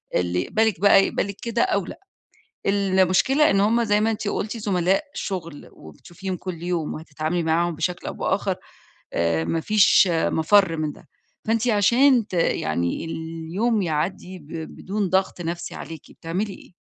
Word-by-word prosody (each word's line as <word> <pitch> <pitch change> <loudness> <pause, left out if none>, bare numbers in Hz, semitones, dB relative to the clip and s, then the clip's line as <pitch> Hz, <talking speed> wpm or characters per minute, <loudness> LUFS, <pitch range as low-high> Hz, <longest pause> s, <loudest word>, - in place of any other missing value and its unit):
اللي 90 0 +1
يقبلِك 220 - 0
بَقى 195 -1 +6
يقبلِك 200 0 -2
كده 235 0 -1
أو 200 -3 0
لأ. - - -9 0.7
المشكلة 195 - +3
إن 195 0 +3
هم 230 +3 +3
زي 210 -1 +2
ما 225 +1 +2
أنتِ 215 -1 -3
قُلتِ 220 +3 -3
زملاء 195 - +1
شُغل 170 -6 -5
وبتشوفيهم 175 - -8
كل 175 -3 -7
يوم 175 -3 -2
وهتتعاملي 155 +2 -3
معاهم 165 +1 +1
بشكل 175 +3 -3
أو - - -4
بآخَر - - -1 0.6
آآ 85 -1 +1
ما 165 - -1
فيش 200 0 +5
مَفَر 165 +2 +3
من 155 -2 -2
ده. - - -18 0.4
فأنتِ 230 +2 +1
عشان 235 +3 +4
ت 185 - -9
يعني 85 - 0
اليوم 165 +7 -2
يعدّي 180 +3 -3
ب 145 - -17
بدون 190 +5 -4
ضغط 190 -1 0
نَفْسي 170 +1 -4
عليكِ، 160 -3 -8
بتعملي 190 +5 -4
إيه؟ - - -16
185 Hz, 155 wpm, -23 LUFS, 165-205 Hz, 0.7 s, بَقى